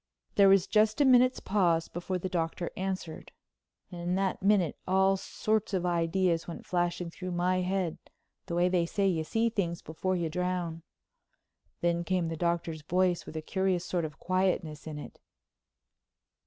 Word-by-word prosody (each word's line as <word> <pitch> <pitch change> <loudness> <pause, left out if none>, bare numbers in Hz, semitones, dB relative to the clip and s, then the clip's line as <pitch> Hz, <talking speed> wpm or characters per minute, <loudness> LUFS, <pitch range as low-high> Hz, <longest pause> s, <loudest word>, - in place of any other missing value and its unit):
There 200 -1 +6
was 195 -2 +5
just 215 +2 +2
a 290 - +5
minute's 255 0 +5
pause 175 -5 +1
before 180 +2 -3
the 180 - -3
Doctor 170 -1 -2
answered. 185 -4 -4 0.6
In 175 0 -2
that 190 0 -1
minute 195 -5 +3
all 190 +1 +4
sorts 215 +1 -1
of 180 -1 -1
ideas 170 0 +1
went 170 - -7
flashing 175 -1 -1
through 185 +1 -6
my 180 +1 +1
head 185 -2 -1 0.5
the 170 - -3
way 175 +1 +3
they 180 -2 +1
say 200 +2 +1
you 165 -4 +1
see 225 +8 +1
things 175 -7 -2
before 185 +4 -2
you 170 -2 -1
drown. 175 0 -2 1.0
Then 170 0 +1
came 180 -2 0
the 165 - -3
Doctor's 170 -1 -1
voice 180 +2 +1
with - - -9
a 155 - -4
curious 190 0 0
sort 175 0 -1
of 150 -3 -5
quietness 180 -5 -1
in 155 -1 -5
it. 150 - -9
180 Hz, 165 wpm, -30 LUFS, 170-190 Hz, 1.0 s, There